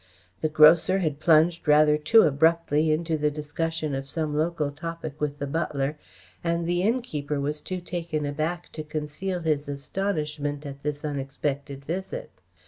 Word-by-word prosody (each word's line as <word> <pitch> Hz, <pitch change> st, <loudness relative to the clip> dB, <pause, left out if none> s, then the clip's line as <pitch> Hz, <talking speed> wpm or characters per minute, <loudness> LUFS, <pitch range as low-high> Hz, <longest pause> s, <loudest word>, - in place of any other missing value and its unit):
The 155 Hz, -, +1 dB
grocer 160 Hz, +5 st, +6 dB
had 155 Hz, -6 st, -1 dB
plunged 165 Hz, +1 st, +4 dB
rather 150 Hz, 0 st, +6 dB
too 155 Hz, +10 st, +5 dB
abruptly 160 Hz, 0 st, +3 dB
into 160 Hz, 0 st, 0 dB
the 150 Hz, 0 st, +2 dB
discussion 155 Hz, +1 st, -3 dB
of 135 Hz, 0 st, -4 dB
some 155 Hz, -1 st, -2 dB
local 155 Hz, -2 st, 0 dB
topic 160 Hz, 0 st, -7 dB
with 145 Hz, -1 st, -1 dB
the 145 Hz, -, -3 dB
butler, 145 Hz, -1 st, -1 dB, 0.5 s
and 170 Hz, 0 st, 0 dB
the 175 Hz, +1 st, +1 dB
innkeeper 180 Hz, -, -1 dB
was 150 Hz, +2 st, -2 dB
too 185 Hz, -1 st, -4 dB
taken 170 Hz, -4 st, -3 dB
aback 155 Hz, +5 st, -3 dB
to 155 Hz, -, -5 dB
conceal 155 Hz, +5 st, -4 dB
his 150 Hz, -3 st, 0 dB
astonishment 150 Hz, -1 st, -2 dB
at 140 Hz, -1 st, -7 dB
this 150 Hz, +1 st, -3 dB
unexpected 140 Hz, 0 st, -3 dB
visit. 190 Hz, -, -4 dB
155 Hz, 150 wpm, -26 LUFS, 145-170 Hz, 0.5 s, grocer